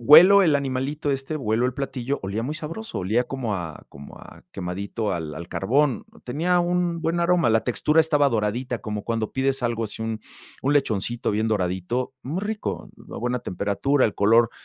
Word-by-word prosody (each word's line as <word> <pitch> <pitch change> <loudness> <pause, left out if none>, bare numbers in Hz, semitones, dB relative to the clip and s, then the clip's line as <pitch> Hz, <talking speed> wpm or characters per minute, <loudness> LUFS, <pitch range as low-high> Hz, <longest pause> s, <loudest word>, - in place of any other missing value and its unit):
Huelo 175 - +9
el 155 -4 +4
animalito 140 +2 -1
este, 135 +3 -2
huelo 120 -3 +1
el 130 - -2
platillo, 135 0 -3
olía 100 +4 -2
muy 145 +4 -3
sabroso, 165 +9 -6
olía 110 +7 +1
como 120 -5 -3
a 85 -4 -7
como 70 0 -12
a - - -14
quemadito 100 +4 -3
al 80 -4 -4
al 85 +3 -8
carbón, 135 +9 +1 0.2
tenía 170 +8 +1
un 175 -1 0
buen 165 +1 0
aroma, 170 -6 +3
la 110 0 +2
textura 150 +5 +1
estaba 150 -3 +3
doradita, 120 +2 -1
como 105 -1 -4
cuando 115 -1 -2
pides 135 0 0
algo 115 -1 0
así, 110 0 -5
un 110 -1 -3 0.4
un 140 - +2
lechoncito 120 -4 0
bien 110 +2 0
doradito, 100 +5 -1
muy 155 +8 -3
rico, 215 0 -3 0.2
a - - -6
buena 125 +1 -1
temperatura, 110 +7 0
el 105 - +1
color, 115 +3 +4
125 Hz, 180 wpm, -24 LUFS, 105-145 Hz, 0.4 s, Huelo